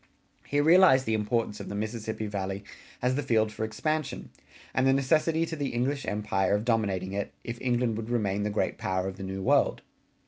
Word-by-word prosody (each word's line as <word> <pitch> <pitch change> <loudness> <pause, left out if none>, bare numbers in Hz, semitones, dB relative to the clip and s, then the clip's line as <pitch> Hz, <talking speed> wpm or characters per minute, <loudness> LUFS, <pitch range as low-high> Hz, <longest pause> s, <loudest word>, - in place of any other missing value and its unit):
He 145 - +1
realized 160 -4 +6
the 110 - 0
importance 110 0 0
of - - -7
the 100 - -4
Mississippi 110 +1 -3
Valley 100 -1 -3 0.4
as 125 +1 +3
the 145 - 0
field 110 -5 +2
for 105 - -4
expansion, 155 +7 -2 0.4
and 130 0 +2
the 135 - +5
necessity 155 +4 +2
to 165 - -5
the 140 -5 -3
English 135 +3 -1
empire 100 -2 +1
of 105 +2 -2
dominating 100 -5 0
it, 100 0 -3
if 120 0 -6
England 120 -2 +1
would 110 0 -5
remain 105 -4 0
the 105 - 0
great 105 - -1
power 95 -4 -1
of 95 - -6
the - - -7
New 95 0 -4
World. - - +2
110 Hz, 200 wpm, -28 LUFS, 100-130 Hz, 0.4 s, realized